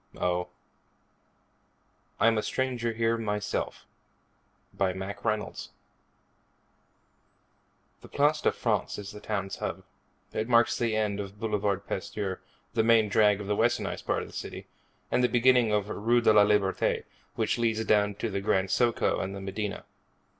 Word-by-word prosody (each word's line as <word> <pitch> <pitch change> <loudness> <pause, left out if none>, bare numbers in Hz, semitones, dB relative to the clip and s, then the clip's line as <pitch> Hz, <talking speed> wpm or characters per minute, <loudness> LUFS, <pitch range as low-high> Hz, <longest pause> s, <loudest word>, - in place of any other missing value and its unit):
Oh,_ 90 0 -1 1.7
I'm 115 -1 +4
A - - 0
Stranger 120 -1 -1
Here 115 0 +1
Myself 105 -2 -3 0.9
By 95 -1 0
MACK 95 +2 -6
REYNOLDS 110 -2 -2 2.3
The - - -12
Place 150 +2 +2
de - - +3
France - - -1
is 105 0 -7
the 105 - -10
town's 100 -2 -3
hub. - - -4 0.5
It 110 +2 -2
marks 120 0 +4
the 115 -3 0
end 105 -2 0
of 100 0 -7
Boulevard 105 -3 -1
Pasteur, 95 0 -4 0.3
the 110 - +2
main 115 -2 +4
drag 105 -1 +4
of - - -6
the 105 +1 0
westernized 120 +3 0
part - - 0
of - - -9
the - - -15
city, - - -6 0.5
and 125 - +2
the 125 - +4
beginning 125 -1 +4
of 105 -1 +1
Rue 115 +3 +1
de 110 - +5
la 105 -1 +7
Liberté, 105 -2 +1 0.3
which 110 +1 0
leads 110 -1 +1
down 105 -1 +3
to 110 +2 -3
the 100 0 -2
Grand 95 -1 +1
Socco 120 +2 +1
and 95 +1 -4
the - - -6
medina. 100 +1 -4
105 Hz, 155 wpm, -28 LUFS, 100-115 Hz, 2.3 s, la